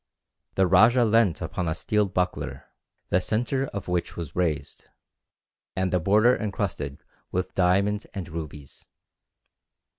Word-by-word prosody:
"The 95 Hz, -, +4 dB
rajah 110 Hz, +7 st, +5 dB
leant 110 Hz, -5 st, +3 dB
upon 90 Hz, -, -3 dB
a 80 Hz, -, 0 dB
steel 105 Hz, +4 st, +1 dB
buckler, 90 Hz, -1 st, -2 dB, 0.4 s
the 90 Hz, -, +2 dB
centre 125 Hz, +7 st, -1 dB
of 100 Hz, -5 st, -6 dB
which 90 Hz, -1 st, -2 dB
was 85 Hz, -4 st, -6 dB
raised, 75 Hz, -6 st, -2 dB, 0.9 s
and 95 Hz, -1 st, 0 dB
the 90 Hz, -, +3 dB
border 105 Hz, +8 st, +4 dB
encrusted 100 Hz, -9 st, -3 dB, 0.3 s
with 95 Hz, +1 st, -2 dB
diamonds 100 Hz, +3 st, +2 dB
and 95 Hz, -4 st, -7 dB
rubies. 75 Hz, -3 st, -8 dB
95 Hz, 125 wpm, -26 LUFS, 85-105 Hz, 0.9 s, rajah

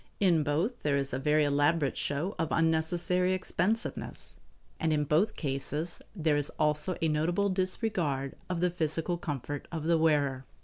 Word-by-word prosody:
In 175 Hz, -5 st, +4 dB
both 160 Hz, -, -1 dB
there 145 Hz, -2 st, +1 dB
is 135 Hz, -2 st, -1 dB
a 130 Hz, -, -1 dB
very 150 Hz, +2 st, +3 dB
elaborate 145 Hz, +1 st, +2 dB
show 155 Hz, +8 st, -2 dB
of 160 Hz, -, +1 dB
unnecessary 170 Hz, +3 st, +2 dB
expensiveness, 205 Hz, +4 st, -2 dB, 0.4 s
and 160 Hz, -, +1 dB
in 150 Hz, -1 st, +2 dB
both 165 Hz, +9 st, +2 dB
cases 145 Hz, +3 st, -3 dB
there 160 Hz, -5 st, +2 dB
is 145 Hz, -1 st, 0 dB
also 150 Hz, +3 st, +1 dB
a -, -, +4 dB
notable 170 Hz, +6 st, +1 dB
disregard 185 Hz, -, -1 dB
of 175 Hz, -2 st, -2 dB
the 180 Hz, 0 st, +2 dB
physical 165 Hz, 0 st, -1 dB
comfort 145 Hz, -3 st, -4 dB
of 160 Hz, -3 st, -4 dB
the 165 Hz, 0 st, +3 dB
wearer. 145 Hz, -5 st, +2 dB
160 Hz, 160 wpm, -30 LUFS, 145-180 Hz, 0.4 s, In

